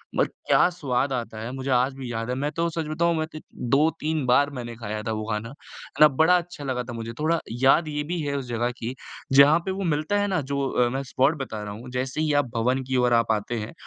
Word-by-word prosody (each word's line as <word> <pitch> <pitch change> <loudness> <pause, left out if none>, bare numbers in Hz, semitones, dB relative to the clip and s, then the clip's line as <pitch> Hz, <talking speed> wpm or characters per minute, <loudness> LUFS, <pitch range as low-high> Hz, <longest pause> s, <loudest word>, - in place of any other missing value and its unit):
But - - +3 0.2
क्या - - +5
स्वाद 135 -6 -1
आता 115 -3 -4
है, 115 +3 -5
मुझे 135 0 -5
आज 130 +2 +2
भी 130 -3 -6
याद 115 +1 -3
है। 125 - -1
मैं 145 +3 -2
तो 170 0 +1
सच 165 -1 -3
बताऊँ, 170 +2 +1
मैं 155 - 0
तो 155 - -6 0.3
2-3 155 +1 +1
बार 140 +3 +4
मैंने 120 -1 -6
खाया 110 -2 -5
था 115 - -2
वो 110 -1 -3
खाना, 105 +2 -3
है 145 +1 -11
ना? 150 - +11
बड़ा 160 +6 +4
अच्छा 175 -4 -6
लगा 130 -2 -2
था 120 -1 -8
मुझे। 115 0 -6
थोड़ा 160 +2 +1 0.2
याद 155 +4 +5
ये 150 -1 -2
भी 170 +3 -3
है 140 -1 -2
उस 135 - -4
जगह 120 +1 -1
की, 120 +2 -5 0.4
जहाँ 145 +4 +7
पे 190 - -1
वो 195 +1 -3
मिलता 155 +4 0
है 205 - +1
ना, 185 -4 0
जो 140 0 -2
अ, 120 -1 +2
मैं 135 +2 -3
स्पॉट 135 +4 +2
बता 110 -5 -5
रहा 105 -1 -6
हूँ। 120 +4 -9
जैसे 130 +4 -2
ही 155 -1 +1
आप 145 - -7
भवन 125 +3 +1
की 130 - 0
ओर 125 -1 +3
आप 115 -1 +3
आते 110 +2 -1
हैं, 105 +7 -6
135 Hz, 260 wpm, -25 LUFS, 120-155 Hz, 0.4 s, ना